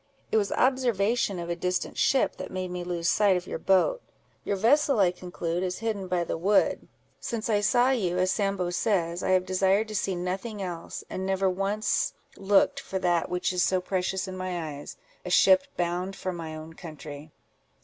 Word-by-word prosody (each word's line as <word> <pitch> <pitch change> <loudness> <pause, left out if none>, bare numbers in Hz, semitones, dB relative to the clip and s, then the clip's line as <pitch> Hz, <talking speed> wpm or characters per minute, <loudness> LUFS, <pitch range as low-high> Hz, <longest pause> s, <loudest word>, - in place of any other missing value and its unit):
It - - +3
was 205 -2 +1
observation 240 -5 +1
of 170 -1 -5
a 170 - -2
distant 180 +1 -2
ship 270 - +2
that - - -6
made 185 -1 -4
me 180 0 -4
lose 175 -1 -2
sight 200 -1 +4
of 180 - -5
your - - -5
boat. 195 - +2 0.4
Your 200 - -1
vessel, 265 +5 +3
I 185 -3 +5
conclude, 175 -1 -4
is 185 -1 -2
hidden 215 -4 -3
by 180 -1 0
the 165 - -4
wood. 200 +4 +2 0.3
Since 230 0 -3
I 205 -1 +3
saw 245 +5 +3
you, 185 -9 0
as 185 0 +2
Sambo 195 -4 0
says, 175 -3 0
I - - -2
have 185 -1 +3
desired 190 +3 +2
to 215 - -5
see 190 -1 0
nothing 190 +5 -4
else; 175 -3 -5
and 185 - -5
never 190 0 +1
once 195 +4 0 0.2
looked 205 +8 +3
for 195 - -4
that 175 -2 +1
which 180 +1 -1
is 180 - +1
so 185 0 +2
precious 185 +1 -2
in 190 - -6
my 175 -5 -4
eyes—a - - -11
ship 280 0 +5
bound 180 +2 -1
for 185 -1 -4
my 165 -2 -6
own 155 +1 -9
country." 155 -3 -9
185 Hz, 190 wpm, -27 LUFS, 175-205 Hz, 0.4 s, I